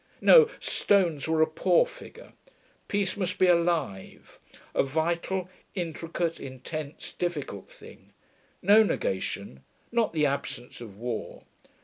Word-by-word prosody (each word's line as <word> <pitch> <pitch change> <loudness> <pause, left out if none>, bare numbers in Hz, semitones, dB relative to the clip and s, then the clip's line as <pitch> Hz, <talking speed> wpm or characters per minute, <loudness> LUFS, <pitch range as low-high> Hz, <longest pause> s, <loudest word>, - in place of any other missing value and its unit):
No, 470 -2 +7
stones 170 -9 +1
were 160 0 +3
a - - +5
poor 160 - +3
figure. - - -13 0.5
Peace 200 -2 0
must 185 -3 -2
be 185 - +4
alive; 170 - 0 0.3
a - - +3
vital, 170 +6 -1 0.3
intricate, 165 -1 -3
intense, 140 +3 -7
difficult 150 - -4
thing. - - -15 0.5
No 205 +4 +7
negation: 95 - -2 0.3
not 235 -2 +1
the 155 -2 +1
absence 135 -3 -3
of 105 -4 -10
war. 120 0 -5
165 Hz, 115 wpm, -27 LUFS, 135-185 Hz, 0.5 s, No